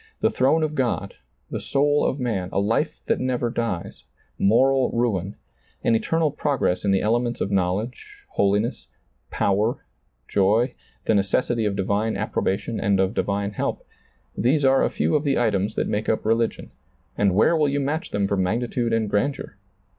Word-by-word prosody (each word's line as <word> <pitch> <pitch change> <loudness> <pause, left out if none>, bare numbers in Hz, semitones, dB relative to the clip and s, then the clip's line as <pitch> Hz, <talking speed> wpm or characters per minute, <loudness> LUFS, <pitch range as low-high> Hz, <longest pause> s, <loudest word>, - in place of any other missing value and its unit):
The - - +2
throne 140 +5 +2
of 155 -1 -1
God, 120 -8 -1 0.4
the - - -3
soul 145 +1 +1
of 140 - -2
man, 105 -8 -2
a - - 0
life 105 +3 0
that - - +1
never 125 -2 -1
dies, 115 -8 -4 0.4
moral 130 +5 +3
ruin, 105 -5 -1 0.5
an - - +3
eternal 155 +7 +1
progress 135 -11 0
in 100 - +1
the 95 -1 +2
elements 120 +2 0
of 100 - -2
knowledge, 110 - -2
holiness, 105 +5 0 0.4
power, 105 +4 0 0.4
joy, 110 +6 +2 0.3
the - - +2
necessity 110 +3 +1
of 100 -1 0
divine 100 +3 0
approbation 105 +4 -2
and 100 -3 +1
of 95 +2 +1
divine 100 -2 -1
help 105 - -3 0.3
— - - -40
these 140 +4 +2
are 135 0 +4
a - - +2
few - - 0
of 150 - +1
the 140 -3 +1
items 105 -3 0
that - - 0
make 105 +1 -2
up 110 - 0
religion, 115 +1 0 0.4
and 100 -3 +2
where 110 - +4
will 150 -3 +2
you 140 +1 0
match 145 +4 -2
them 100 -1 0
for 100 - 0
magnitude 115 +5 -1
and 115 -1 +1
grandeur? 105 +2 -1
115 Hz, 170 wpm, -23 LUFS, 100-130 Hz, 0.5 s, are